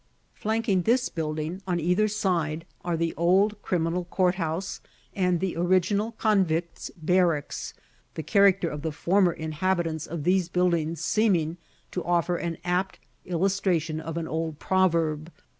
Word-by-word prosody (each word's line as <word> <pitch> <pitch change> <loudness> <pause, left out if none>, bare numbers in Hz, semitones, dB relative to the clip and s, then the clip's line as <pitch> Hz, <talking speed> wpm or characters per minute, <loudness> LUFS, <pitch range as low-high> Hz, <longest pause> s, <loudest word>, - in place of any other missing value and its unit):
Flanking 220 -3 0
this 240 +7 +2
building 155 +2 -3
on 175 -2 0
either 180 +6 +2
side 170 -6 -1 0.2
are 175 -2 -1
the 165 0 -1
old 195 +5 +2
Criminal 175 0 -1
Courthouse, 180 0 -1 0.3
and 180 -3 +1
the 190 0 -2
original 185 +5 +1
Convicts' 185 -7 0
Barracks 170 -2 0 0.4
the 160 - -4
character 195 +1 +4
of 150 -2 -5
the 160 +1 -2
former 180 +4 +2
inhabitants 160 0 -2
of 160 -2 -5
these 180 +1 +2
buildings 170 -3 0
seeming 175 -5 +1 0.3
to 180 - -3
offer 175 +1 +1
an 170 -2 -3
apt 180 +2 0 0.3
illustration 175 -3 0
of 165 +1 -5
an 165 -1 -3
old 160 -1 -3
proverb. 165 -4 +1
175 Hz, 135 wpm, -26 LUFS, 160-190 Hz, 0.4 s, character